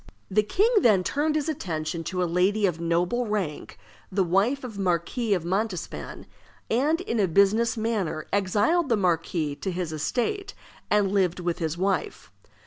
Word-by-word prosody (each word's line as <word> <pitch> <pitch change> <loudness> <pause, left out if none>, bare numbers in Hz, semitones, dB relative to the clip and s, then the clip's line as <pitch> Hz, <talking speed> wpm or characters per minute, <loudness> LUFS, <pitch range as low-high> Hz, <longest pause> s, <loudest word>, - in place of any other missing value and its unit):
The 215 +3 +4
king 375 - +2
then 205 - +4
turned 300 +8 0
his 305 -1 0
attention 165 - -3
to 180 -1 -1
a - - +2
lady 200 +4 +2
of 170 -3 -1
noble 175 +9 0
rank, 195 -8 -3 0.3
the 190 0 +2
wife 200 +11 +1
of 245 -3 -6
the - - -3
Marquis 190 +5 0
of 170 -3 -4
Montespan, 190 +1 -3 0.5
and 295 +9 +2
in 235 -11 -2
a 195 - +3
business 200 +7 +3
manner 205 -9 -2
exiled 210 - +2
the 230 - +3
marquis 165 -5 0
to 195 - -4
his 175 -3 -3
estate, 325 - -2 0.3
and 205 -2 +2
lived 185 -3 +1
with 175 -1 -2
his 160 -1 -2
wife. 200 - -2
195 Hz, 165 wpm, -26 LUFS, 175-235 Hz, 0.5 s, The